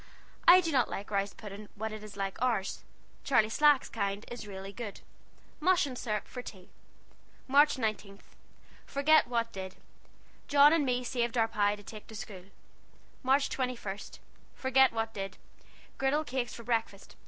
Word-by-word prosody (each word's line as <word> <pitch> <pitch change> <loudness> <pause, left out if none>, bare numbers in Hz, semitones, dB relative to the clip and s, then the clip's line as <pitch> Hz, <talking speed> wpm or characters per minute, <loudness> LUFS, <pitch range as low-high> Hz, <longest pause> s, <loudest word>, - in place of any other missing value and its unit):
I 365 +1 +10
do 330 -2 -2
not 260 -4 +2
like 205 +2 -6
rice 200 0 0
puding 210 0 -9
when 220 +1 -4
it 215 -1 -8
is 210 -1 -10
like 195 -1 -4
ours. 230 -6 0 0.4
Charley 230 -6 +3
Slack's 295 +3 +4
kind 200 -1 -3
is 240 -2 -6
rele 195 0 -8
good. 225 -5 -7 0.6
Mush 355 0 +3
and 265 -3 -6
sirup 215 -4 -3
for 250 - -7
tea. 190 -6 -11 0.8
March 285 +2 +5
19. 215 -4 -3 0.7
Forgit 300 +2 +4
what 230 -1 -1
did. 190 -2 -7 0.7
John 290 +1 +7
and 305 -4 +2
me 250 0 0
saved 240 -1 -1
our 225 -1 +4
pie 205 -2 +1
to 205 - -14
take 215 +1 -10
to 220 - -11
schule. 195 -3 -8 0.8
March 270 +2 +3
21. 245 -6 -3 0.6
Forgit 265 0 +4
what 225 0 -2
did. 195 -2 -5 0.6
Gridel 285 +3 +1
cakes 250 -2 -3
for 235 - -9
brekfast. 225 -4 -2
230 Hz, 160 wpm, -31 LUFS, 205-265 Hz, 0.8 s, I